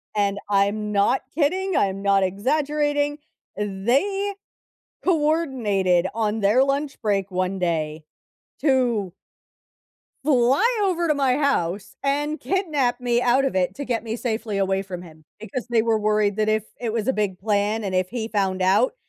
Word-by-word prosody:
and 200 Hz, -1 st, +1 dB
I'm 205 Hz, +1 st, +1 dB
not 205 Hz, +6 st, +2 dB
kidding, 365 Hz, +5 st, 0 dB
I'm 195 Hz, 0 st, 0 dB
not 200 Hz, -1 st, +3 dB
exaggerating, 290 Hz, +8 st, 0 dB, 0.4 s
they 265 Hz, -, 0 dB, 0.7 s
coordinated 265 Hz, -, +1 dB
on 220 Hz, -1 st, -1 dB
their 210 Hz, +6 st, +4 dB
lunch 275 Hz, +1 st, -1 dB
break 200 Hz, -2 st, 0 dB
one 185 Hz, +1 st, -1 dB
day 155 Hz, -3 st, -2 dB, 0.6 s
to 240 Hz, -, +1 dB, 1.1 s
fly 270 Hz, -, +3 dB, 0.2 s
over 345 Hz, -3 st, +1 dB
to 305 Hz, -, +3 dB
my 275 Hz, -2 st, +1 dB
house 200 Hz, -, -1 dB
and 290 Hz, +2 st, 0 dB
kidnap 305 Hz, -11 st, 0 dB
me 240 Hz, -1 st, +1 dB
out 250 Hz, +3 st, +3 dB
of 265 Hz, -, -1 dB
it 180 Hz, 0 st, 0 dB
to 285 Hz, -, -5 dB
get 235 Hz, -3 st, -1 dB
me 225 Hz, 0 st, -3 dB
safely 220 Hz, -3 st, -3 dB
away 195 Hz, 0 st, +1 dB
from 185 Hz, -2 st, -7 dB
him, 160 Hz, -3 st, -14 dB, 0.2 s
because 225 Hz, +3 st, -5 dB
they 230 Hz, -2 st, +3 dB
were 225 Hz, -1 st, +1 dB
worried 210 Hz, -1 st, +1 dB
that 215 Hz, 0 st, +1 dB
if 215 Hz, -1 st, +1 dB, 0.2 s
it 230 Hz, -, -1 dB
was 225 Hz, -1 st, -2 dB
a 265 Hz, -, +3 dB
big 205 Hz, -5 st, -1 dB
plan, 210 Hz, +2 st, 0 dB
and 190 Hz, -2 st, -3 dB
if 185 Hz, 0 st, +1 dB
he 225 Hz, -2 st, -3 dB
found 190 Hz, -3 st, -1 dB
out 195 Hz, -, +3 dB
220 Hz, 155 wpm, -23 LUFS, 195-275 Hz, 1.1 s, their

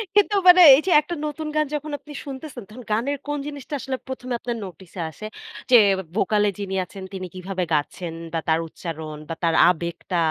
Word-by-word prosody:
কিন্তু 415 Hz, 0 st, +4 dB
মানে 360 Hz, 0 st, +9 dB
এই 285 Hz, -, +2 dB
যে -, -, +2 dB
একটা 345 Hz, +3 st, -5 dB
নতুন 305 Hz, +1 st, -4 dB
গান 305 Hz, 0 st, +3 dB
যখন 300 Hz, +1 st, -5 dB
আপনি 295 Hz, -, -12 dB
শুনতেছেন 265 Hz, -3 st, -7 dB
তখন 245 Hz, +4 st, -11 dB
গানের 255 Hz, +7 st, 0 dB
কোন 295 Hz, 0 st, -1 dB
জিনিসটা 285 Hz, -1 st, -8 dB
আসলে 260 Hz, +2 st, -3 dB
১ম 260 Hz, -1 st, -7 dB
এ -, -, +1 dB
আপনার 240 Hz, -1 st, -4 dB
নোটিসে 180 Hz, 0 st, -11 dB
আসে 215 Hz, -, -10 dB, 0.5 s
যে 245 Hz, -, +10 dB, 0.4 s
ভোকালে 210 Hz, 0 st, +2 dB
যিনি 195 Hz, -1 st, -3 dB
আছেন 195 Hz, 0 st, -10 dB
তিনি 185 Hz, -1 st, -5 dB
কিভাবে 185 Hz, 0 st, -3 dB
গাচ্ছেন 160 Hz, +3 st, -2 dB, 0.2 s
বা 165 Hz, -, 0 dB
তার 160 Hz, 0 st, +3 dB
উচ্চারণ 160 Hz, -2 st, -7 dB
বা 165 Hz, -, -3 dB
তার 165 Hz, -1 st, +2 dB
আবেগটা 170 Hz, +1 st, -2 dB
215 Hz, 190 wpm, -23 LUFS, 180-285 Hz, 0.5 s, যে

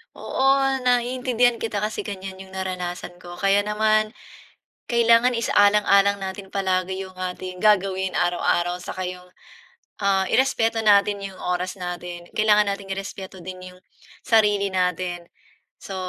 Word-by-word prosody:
Oo, 270 Hz, 0 st, +1 dB
naiintindihan 245 Hz, -1 st, +2 dB
kita, 210 Hz, -2 st, -3 dB
kasi 215 Hz, +1 st, -3 dB
ganyan 190 Hz, -2 st, -7 dB
'yong 190 Hz, 0 st, -12 dB
naranasan 180 Hz, -1 st, -5 dB
ko 175 Hz, -1 st, -10 dB
kaya 195 Hz, +2 st, +2 dB
naman, 215 Hz, +1 st, +1 dB, 0.8 s
kailangan 235 Hz, +1 st, +4 dB
isa-alang-alang 200 Hz, -2 st, +4 dB
natin 190 Hz, 0 st, -7 dB
palagi 190 Hz, -1 st, -1 dB
'yong 185 Hz, -, -15 dB
ating 185 Hz, 0 st, -6 dB
gagawin 190 Hz, -3 st, +2 dB
araw-araw 175 Hz, 0 st, +1 dB
saka 185 Hz, -1 st, -5 dB
'yong, 180 Hz, 0 st, -8 dB, 0.7 s
ah, 195 Hz, -1 st, +2 dB
i-respeto 230 Hz, -4 st, +2 dB
natin 205 Hz, -1 st, +4 dB
'yong 195 Hz, -1 st, -7 dB
oras 180 Hz, +1 st, -2 dB
natin, 175 Hz, -1 st, -6 dB
kailangan 210 Hz, -1 st, +3 dB
natin 200 Hz, 0 st, -6 dB
i-respeto 195 Hz, -1 st, -7 dB
din 185 Hz, 0 st, -8 dB
'yong 180 Hz, -, -19 dB, 0.4 s
sarili 205 Hz, -3 st, +3 dB
natin. 180 Hz, -1 st, -1 dB, 0.5 s
So, 195 Hz, -, -7 dB
195 Hz, 125 wpm, -23 LUFS, 185-215 Hz, 0.8 s, kailangan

